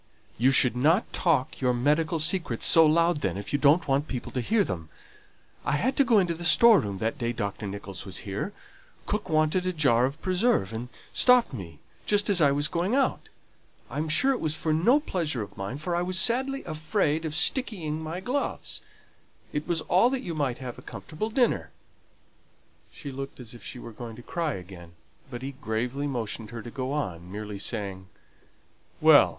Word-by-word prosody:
"You 125 +3 +5
should 130 -2 +4
not 160 - +2
talk 150 -8 +1
your 125 -1 +2
medical 150 +6 +1
secrets 155 - +1
so 165 -1 +7
loud 170 +2 +3
then, 95 -10 -2
if 100 - -7
you 145 - +2
don't 155 +4 +4
want 140 +2 +1
people 125 -3 -5
to 125 - -2
hear 210 - +2
them. 80 - -5 0.7
I - - 0
had 255 - +1
to 280 - +6
go 245 -5 +4
into 180 -4 +2
the 170 +1 -7
store 225 +3 +7
room 100 -2 -4
that 110 +3 -2
day 120 0 -1
Dr. 105 -2 -4
Nicholls 100 -2 -6
was 95 -4 -6
here; 100 - -3 0.5
cook 210 0 -3
wanted 155 +4 +2
a - - +1
jar 130 -7 +3
of 140 +4 -4
preserve, 185 - +1
and 120 +2 -5 0.2
stopped 250 - +4
me 85 - -8 0.3
just 205 0 +2
as 180 -4 +3
I 145 -2 +5
was 145 +2 +2
going 180 +9 0
out 275 -1 0 0.6
I - - -3
am 155 +1 -2
sure 260 - +3
it 260 - -1
was 155 -1 0
for 155 -1 -1
no 230 - +4
pleasure 160 - -2
of 100 - -12
mine, 100 +7 -5
for 170 +4 -3
I 175 - +1
was 180 +1 -1
sadly 265 +6 +1
afraid 155 0 -1
of 155 -2 -3
stickying 160 - 0
my 160 +3 -5
gloves 260 +7 -3 0.7
it 150 0 -3
was 165 -2 0
all 190 +10 +3
that 265 -1 -2
you 170 - -4
might 140 -6 -1
have 125 -2 -7
a - - -11
comfortable 165 +8 -6
dinner." 245 +1 +1 1.2
She 145 - -8
looked 135 +1 -7
as 120 -3 -8
if 120 -4 -13
she - - -7
was 115 -2 -10
going 115 -2 -7
to 120 - -12
cry 165 -1 -2
again, 90 -2 -10 0.4
but 125 -1 -7
he 135 - -4
gravely 130 +1 -3
motioned 115 -4 -4
her 115 0 -7
to 120 - -8
go 130 0 -4
on, 90 - -4
merely 105 0 -6
saying, 100 -3 -3 0.9
"Well! - - +7
150 Hz, 200 wpm, -27 LUFS, 120-175 Hz, 1.2 s, so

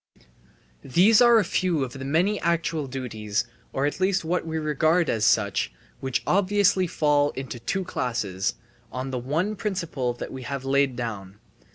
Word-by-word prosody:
These 195 - +5
are 240 -1 +7
a 210 - +3
few 175 -4 0
of 125 - -5
the 135 - -7
many 175 +9 +1
actual 165 -3 0
duties, 115 -5 -3 0.3
or 135 - 0
at 145 - -2
least 190 -2 +1
what 170 0 -1
we 160 0 -2
regard 155 +2 +2
as 110 -1 0
such, 100 - +2 0.3
which 130 -2 -2
obviously 200 -1 +3
fall 145 -3 +2
into 130 -3 -6
two 190 +12 -2
classes 105 - -2 0.4
on 130 +1 -4
the 130 - -2
one 160 - -1
principle 170 - -2
that 120 - -7
we 130 - -6
have 135 +1 -5
laid 135 -1 +2
down. 105 -5 -6
145 Hz, 165 wpm, -25 LUFS, 125-180 Hz, 0.4 s, are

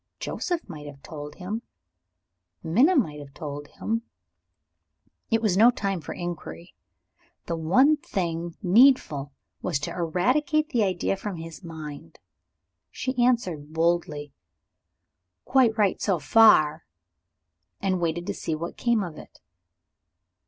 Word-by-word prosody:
Joseph 350 -2 -3
might 150 -5 -9
have 140 -1 -12
told 150 -2 -8
him; 200 +5 -4 1.0
Minna 245 - +4
might 155 - +1
have 140 -1 -12
told 145 -2 -6
him. 225 +1 -3 1.3
It 225 0 +1
was 205 -5 +2
no 225 +5 +7
time 195 -7 -2
for - - -6
inquiry; 175 0 -7 0.7
the 170 - -2
one 225 - +4
thing 170 - -3
needful 180 - +4 0.3
was 175 -6 0
to - - -3
eradicate 255 - +1
the 245 -8 +1
idea 190 -1 0
from 195 0 -5
his 165 +2 -9
mind. 155 -3 -9 0.7
She 255 -1 -1
answered 180 -12 0
boldly, 160 -3 0 1.1
"Quite 245 -4 +3
right, 205 -3 +2
so 195 -4 +1
far" 155 -3 +5 0.9
and 185 -2 0
waited 170 +1 -1
to 200 - -2
see 160 -4 -3
what 170 +2 -6
came 235 -4 +1
of 170 -4 -7
it.) - - -15
175 Hz, 125 wpm, -26 LUFS, 160-225 Hz, 1.3 s, no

